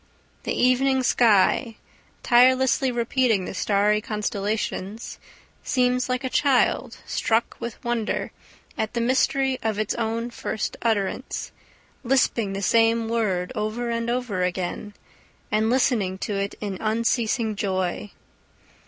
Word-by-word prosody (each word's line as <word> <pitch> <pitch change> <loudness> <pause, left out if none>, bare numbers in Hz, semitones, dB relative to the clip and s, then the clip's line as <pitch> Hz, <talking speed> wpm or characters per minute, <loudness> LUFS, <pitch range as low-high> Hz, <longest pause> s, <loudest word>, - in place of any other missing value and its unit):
The - - -2
evening 260 +1 +3
sky, 225 0 +3 0.5
tirelessly 255 +2 +4
repeating 235 -4 +1
the - - -6
starry 205 +2 +2
constellations, 210 0 -3 0.4
seems 250 0 +1
like 255 +1 -1
a - - -1
child 270 0 +1
struck 225 +1 0
with 235 -1 -7
wonder 240 -2 -2 0.5
at 220 +2 -2
the - - +1
mystery 260 +2 +1
of 220 -2 -1
its 215 -1 -1
own 230 +1 -2
first 220 - -4
utterance, 210 -4 -2 0.5
lisping 235 -5 +1
the 195 +1 -4
same 225 +2 +3
word 195 -6 0
over 230 +2 -2
and 230 0 -2
over 240 -6 -1
again, 180 +3 -3 0.6
and 215 +1 +2
listening 230 -7 +1
to 205 - -4
it 200 0 -2
in 200 -3 -4
unceasing 225 0 0
joy. 190 0 -2
225 Hz, 120 wpm, -24 LUFS, 205-245 Hz, 0.6 s, tirelessly